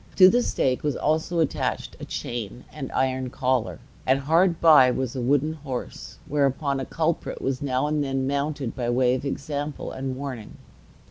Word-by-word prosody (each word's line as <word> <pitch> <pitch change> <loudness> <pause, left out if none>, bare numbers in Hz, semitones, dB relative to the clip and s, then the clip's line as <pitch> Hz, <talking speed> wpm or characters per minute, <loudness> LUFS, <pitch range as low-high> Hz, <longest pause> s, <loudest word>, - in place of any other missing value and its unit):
To 185 -1 +9
the 245 +5 +3
stake 130 - 0
was 145 -2 -1
also 160 +3 0
attached 155 - -2
a - - -6
chain 120 0 -5
and 140 -4 -6
iron 130 -1 0
collar; 125 -2 0 0.3
and 135 +1 +2
hard 165 +4 +3
by 150 -6 +7
was 130 0 -2
a 130 - -2
wooden 145 +5 +2
horse, 140 -5 -7
whereon 140 -1 +1
a 135 - -3
culprit 165 0 -2
was 130 -1 -2
now 130 -1 0
and 150 0 0
then 135 -1 -1
mounted 140 -2 -2
by 120 -2 -2
way 125 0 +3
of 130 +2 -3
example 145 +1 -4
and 130 -1 -4
warning. 130 -5 -7
135 Hz, 175 wpm, -25 LUFS, 130-150 Hz, 0.3 s, To